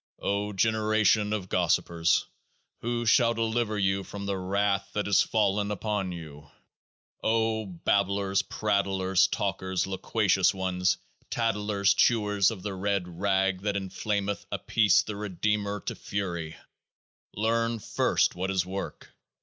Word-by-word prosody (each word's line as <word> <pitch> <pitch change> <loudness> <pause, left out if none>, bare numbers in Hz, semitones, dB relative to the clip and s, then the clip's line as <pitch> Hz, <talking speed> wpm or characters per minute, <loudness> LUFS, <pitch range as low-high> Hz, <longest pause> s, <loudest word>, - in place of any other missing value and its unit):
O 100 +1 -1
generation 110 0 +2
of 105 -4 -2
gossipers! 85 -2 +1 0.5
who 120 0 -2
shall 115 0 +4
deliver 115 -1 0
you 95 -1 +1
from 100 +2 -7
the 100 0 -1
Wrath 100 +1 0
that 105 -1 -1
is 100 - +5
fallen 105 -1 +1
upon 105 -2 -2
you? 75 -4 -9 0.7
O 110 -1 +1
Babblers, 100 +2 +1
Prattlers, 95 -3 +1
Talkers, 95 -1 -1
Loquacious 95 0 +1
Ones, 95 0 0 0.3
Tatlers, 105 -3 +1
Chewers 105 -2 +3
of 105 -6 -7
the 105 - -3
Red 95 -3 -2
Rag 95 -1 +1
that 105 0 -1
inflameth 100 0 -2
Apis 105 -5 +3
the 105 - -6
Redeemer 105 0 -1
to - - -4
fury, 85 -5 -4 0.8
learn 115 +2 +1
first 105 - +1
what 95 +2 -3
is 95 -2 +1
Work 95 +1 -6
100 Hz, 125 wpm, -28 LUFS, 95-105 Hz, 0.8 s, is